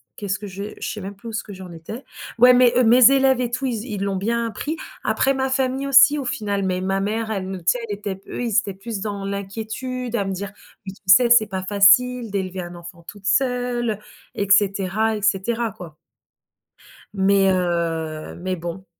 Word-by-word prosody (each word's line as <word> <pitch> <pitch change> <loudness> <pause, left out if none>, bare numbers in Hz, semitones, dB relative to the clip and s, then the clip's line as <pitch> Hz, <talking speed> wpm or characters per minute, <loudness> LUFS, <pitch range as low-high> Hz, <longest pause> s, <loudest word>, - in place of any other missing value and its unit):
qu'est-ce 200 -1 -3
que 205 - -9
je 195 +1 -7 0.2
je - - -4
sais 210 - -6
même 195 +1 -7
plus 230 +3 -10
où - - -8
ce 220 - -3
que 205 - -10
j'en 185 -2 -10
étais. 170 - -9 0.3
Ouais, 250 +2 +7
mes 245 0 +4
mes 245 +3 +7
élèves 265 -2 +3
et 240 - -1
tout, 260 +3 -3
ils 225 -3 -3
z - - -5
l'ont 200 -1 -1
bien 230 +3 -1
pris. 300 +9 -4 0.3
Après 275 - +1
ma 265 0 -1
famille 265 +1 -1
aussi 275 +2 +6
au 270 - -4
final, 205 -4 -2
mais 185 -1 -1
ma 195 +1 -1
mère, 220 +2 -2
elle 190 -3 -3
nous 190 - -4
tu - - -18
sais, 245 - +2
elle 205 - -2
était 205 -2 -4
p 195 - -20
eux, - - -4
ils 225 -3 0
étaient 200 -4 -6
plus 205 +1 -6
dans 205 -2 -4
l'inquiétude 225 +5 -5
à 200 - -1
me 195 - -2
dire: 195 +1 -5 0.3
«Mais 190 - -5
tu - - -21
sais, 235 +6 +6
c'est 220 -3 +6
pas 190 -2 -4
facile 215 +5 +4
d'élever 190 -2 -3
un 175 0 -8
enfant 170 0 -12
toute 200 +2 -12
seule» 245 -3 0 0.4
et 200 -1 -2
cetera 200 +2 +2
et - - -7
cetera, 225 +2 0
quoi. 175 -7 -11 1.2
Mais 195 0 +3
heu, 165 -4 -2
mais 185 +1 -3
bon. 175 +2 -7
205 Hz, 215 wpm, -22 LUFS, 190-240 Hz, 1.2 s, Ouais